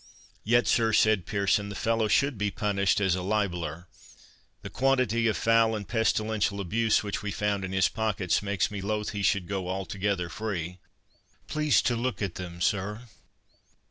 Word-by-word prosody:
"Yet, 120 +3 +3
sir," 115 -1 +2
said 110 -4 +3
Pearson, 100 0 +1
"the 100 - -7
fellow 115 -1 +1
should 140 +5 +2
be 105 0 -1
punished 100 -2 +1
as 95 -3 +2
a 90 - -1
libeller. 90 -5 -2 0.8
The - - -7
quantity 130 -4 +2
of 110 - +1
foul 115 -1 +3
and 105 -2 -6
pestilential 110 -3 0
abuse 110 +5 +1
which 100 -1 -3
we 105 - -4
found 100 -1 -1
in 95 - -4
his 95 -2 +3
pockets 105 -5 0
makes 100 -1 -1
me 100 -2 -5
loth 105 +1 -2
he 105 - -4
should 100 -2 +1
go 95 -2 -3
altogether 95 0 -2
free—Please 100 - -3
to 120 - +1
look 120 -2 -2
at 100 -5 -2
them, 85 -1 -8
sir." 105 +5 -1
105 Hz, 165 wpm, -27 LUFS, 95-110 Hz, 0.8 s, Yet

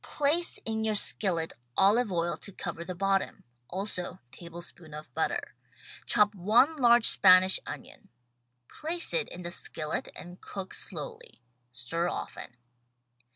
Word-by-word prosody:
Place 310 +4 +1
in 220 0 -1
your 220 -1 +1
skillet 180 -5 0 0.2
olive 210 +3 +4
oil 170 -1 0
to 200 - -6
cover 170 -2 -5
the 180 +1 -6
bottom; 195 +1 0 0.3
also 185 -1 -4
tablespoon 170 +1 -8
of 150 0 -10
butter. - - -2 0.5
Chop 210 0 +4
one 225 - +4
large 240 -3 +5
Spanish 185 0 +7
onion. - - -9 0.6
Place 335 +3 -3
it 485 - 0
in 180 - -8
the 175 - -4
skillet 155 -2 -3
and 175 +1 -10
cook 195 -2 -7
slowly. 475 - -8 0.3
Stir 165 +8 -2
often. 120 - -6
195 Hz, 130 wpm, -29 LUFS, 175-230 Hz, 0.6 s, Spanish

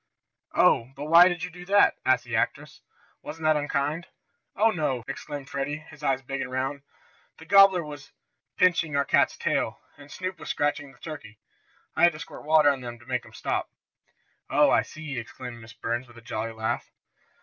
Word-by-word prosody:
"Oh, 115 - +4
but 145 +1 -6
why 170 +3 +8
did 175 -2 -2
you 180 - -4
do 180 +1 -11
that?" 200 +2 +5
asked 130 -2 +3
the 120 -2 -4
actress. 110 - -2 0.4
"Wasn't 160 +1 -8
that 155 0 +4
unkind?" 150 +3 -1 0.5
"Oh, 220 +2 +4
no!" 145 - -1
exclaimed 135 0 -6
Freddie, 140 +2 -3
his 150 -1 -15
eyes 135 -2 0
big 135 +1 -4
and - - -4
round. 135 +2 -2 0.6
"The 160 - -13
gobbler 195 -1 +6
was 145 -3 -10 0.5
pinching 170 -4 +3
our 140 0 +2
cat's - - +2
tail, - - -1 0.2
and 145 0 -13
Snoop 185 -2 -5
was - - -8
scratching 145 -1 -1
the 130 - -21
turkey. 120 -7 -9 0.6
I - - -1
had 175 0 +6
to 150 - -9
squirt - - -10
water 155 -1 +5
on 135 -2 -4
them 120 -1 -7
to 120 - -19
make 125 0 -1
them 110 -1 -17
stop." - - -2 0.8
"Oh, - - +4
I - - +5
see!" 155 -5 -6
exclaimed 120 +1 -9
Miss 115 0 -12
Burns 120 +3 -3
with 120 0 -17
a - - -12
jolly 115 -1 -4
laugh. 110 +1 -3
145 Hz, 195 wpm, -26 LUFS, 125-160 Hz, 0.8 s, why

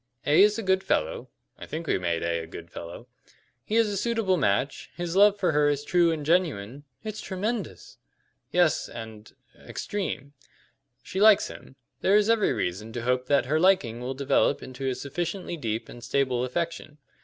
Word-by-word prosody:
A 145 +4 +5
is 210 +1 +5
a 225 - -3
good 190 0 +2
fellow - - -1 0.3
(I - - -9
think 165 +2 -5
we 145 - +1
made 85 -2 -1
A 85 0 0
a 80 - -7
good 85 +1 -10
fellow), 85 +8 -9 0.6
he 215 - -3
is 230 -1 +4
a 205 - -2
suitable 225 -2 +1
match, 130 - 0
his 175 0 -4
love 205 +1 +5
for 180 - +2
her 150 -1 +3
is 145 0 -1
true 175 +2 +3
and 155 -3 -3
genuine 145 - 0
" - - -44
"It's 215 -1 -5
tremendous!" 210 +5 -4 0.5
"Yes 175 -3 +2
and 110 -2 -9 0.2
er - - -22
extreme. 150 -8 -4 0.7
She 190 - -4
likes 215 -1 +6
him. 130 - -12 0.2
There 195 - +3
is 210 +1 +4
every 225 -2 +3
reason 100 +6 -3
to 120 - -4
hope 125 +1 0
that 140 -1 +3
her 150 +5 +1
liking 160 -11 +3
will 130 +2 -4
develop 140 +1 +1
into 130 +1 -4
a 130 - -2
sufficiently 175 +7 -4
deep 115 -6 -3
and 120 - -11
stable 125 -1 0
affection. 165 +2 -4
150 Hz, 190 wpm, -26 LUFS, 125-190 Hz, 0.7 s, likes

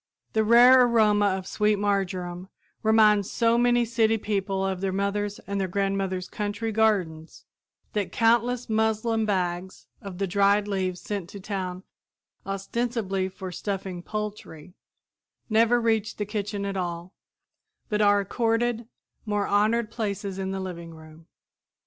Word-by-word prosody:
The 220 - +2
rare 245 +3 +7
aroma 215 -4 +3
of 190 -1 -2
sweet 210 +2 +1
marjoram 190 -3 -2 0.3
reminds 215 -2 +4
so 230 -1 +2
many 240 0 +3
city 225 -1 +2
people 195 -2 -2
of 190 -1 -2
their 195 -1 -1
mother's 200 +1 -2
and 200 0 -2
their 190 - -1
grandmother's 195 -1 -1
country 210 +2 -3
gardens, 190 -8 0 0.5
that 200 -4 -2
countless 235 +3 +2
muslin 220 0 +1
bags 185 -2 -2 0.2
of 195 -3 -8
the 195 - 0
dried 200 +2 +2
leaves 185 -3 -2
sent 200 -4 -5
to 200 - -9
town 185 -2 -4 0.6
ostensibly 195 -1 -2
for 190 0 -8
stuffing 190 -1 -4
poultry 205 -5 -6 0.8
never 230 +2 +4
reach 225 -2 0
the 210 - -2
kitchen 205 -1 -3
at 200 0 -3
all, 175 -1 -4 0.7
but 210 -1 0
are 205 -1 +5
accorded 230 +2 -1 0.4
more 205 -1 0
honored 215 +2 +1
places 200 -4 -4
in 190 0 -3
the 195 0 -3
living 170 -3 -7
room. 160 +1 -15
205 Hz, 135 wpm, -26 LUFS, 190-220 Hz, 0.8 s, rare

